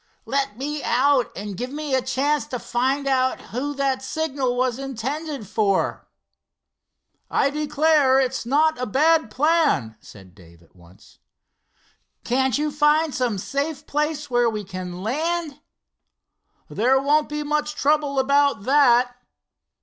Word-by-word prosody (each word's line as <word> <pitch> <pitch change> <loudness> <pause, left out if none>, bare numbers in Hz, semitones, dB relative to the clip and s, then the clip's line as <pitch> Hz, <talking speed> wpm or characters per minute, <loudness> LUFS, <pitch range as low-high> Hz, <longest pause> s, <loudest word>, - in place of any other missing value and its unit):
"Let 270 -6 -2
me 295 +3 -4
out, 260 +1 +2
and 200 0 -6
give 250 +7 -4
me 295 0 -5
a 260 - +3
chance 275 +3 0
to 250 - -4
find 265 +4 -1
out 260 -1 +1
who 285 +5 -5
that 270 -1 0
signal 270 -3 -2
was 255 0 0
intended 275 0 -5
for." 200 -1 0 1.2
"I 275 - +1
declare, 300 -2 +3
it's 265 0 -1
not 295 +3 +1
a 250 - -2
bad 310 +3 +3
plan," 295 - +1
said 95 -3 -15
Dave 85 -3 -19
at 85 - -28
once. 85 +1 -20 1.0
"Can't 260 +1 +1
you 300 0 -1
find 300 +1 +2
some 245 -5 -1
safe 280 +7 -3
place 300 0 -2
where 240 -2 +2
we 215 -2 -4
can 185 -1 -7
land?" 315 +5 -2 1.1
"There 255 +5 +2
won't 295 +2 +2
be 300 0 -3
much 300 0 -1
trouble 290 -1 +1
about 280 -4 +2
that." 250 -2 +4
270 Hz, 135 wpm, -23 LUFS, 240-295 Hz, 1.2 s, that